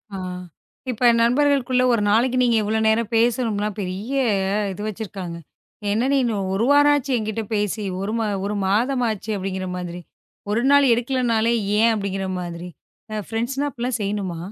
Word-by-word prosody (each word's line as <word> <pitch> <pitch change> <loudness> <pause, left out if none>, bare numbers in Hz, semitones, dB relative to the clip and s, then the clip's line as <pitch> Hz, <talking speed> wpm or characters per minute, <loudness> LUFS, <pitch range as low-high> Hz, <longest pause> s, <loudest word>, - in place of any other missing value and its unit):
ஆ. - - -4 0.7
இப்ப 245 +1 +3
நண்பர்களுக்குள்ள 255 0 +2
ஒரு 230 - +1
நாளைக்கு 245 +4 +2
நீங்க 240 -2 +3
எவ்வளவு 220 +1 0
நேரம் 220 +1 +1
பேசணும்னு 225 -3 +1
பெரிய 195 +6 -4 0.6
இது 205 - -8
வச்சிருக்காங்க. 190 -5 -6 0.5
என்ன 230 +5 +1
நீனு 250 -5 +2 0.2
1 205 +4 +1
வாரமாச்சு 290 -1 +4
என்கிட்ட 220 0 -3
பேசி 210 +1 -1 0.2
ஒரு, 200 +2 -2 0.3
ஒரு 210 - -2
மாதமாச்சு 225 0 0
அப்படிங்கிற 190 0 -4
மாதிரி 175 0 -6 0.5
ஒரு 225 +3 +1
நாள் 285 -3 +6
எடுக்கலைன்னாலே 235 -2 +1 0.3
ஏன் 230 +1 +5
அப்படிங்கிற 195 -2 -3
மாதிரி 175 0 -6 0.6
ஃபிரண்ட்ஸ்ன்னா 240 +6 -1
அப்படி 240 - -12
எல்லாம் 250 -2 -1
செய்யணுமா? 195 -4 -2
225 Hz, 135 wpm, -22 LUFS, 200-245 Hz, 0.7 s, நாள்